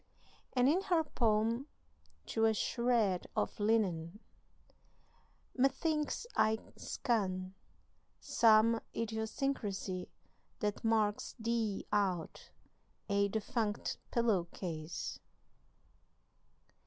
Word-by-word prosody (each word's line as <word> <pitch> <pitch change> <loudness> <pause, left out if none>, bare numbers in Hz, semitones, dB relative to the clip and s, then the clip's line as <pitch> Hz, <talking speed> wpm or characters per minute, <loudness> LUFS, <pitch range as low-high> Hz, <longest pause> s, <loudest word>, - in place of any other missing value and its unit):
And 250 -1 +4
in 335 +7 +4
her 350 -4 +2
poem 230 -1 +1 0.6
"To 225 - +1
a 220 0 +3
Shred 230 -6 +1
of - - -1
Linen": 205 -4 +1 1.4
"Methinks 300 - +1
I 220 0 +3 0.2
scan 185 -6 -1 0.7
Some 225 0 +4
idiosyncrasy 220 -4 -2 0.5
that 210 -2 -2
marks 220 -2 +1
thee 225 -3 -1
out 190 -5 -1 0.6
A 200 0 +3
defunct 215 +1 -2
pillow 225 -7 +2
case." 165 -2 -5
220 Hz, 80 wpm, -34 LUFS, 200-235 Hz, 1.4 s, And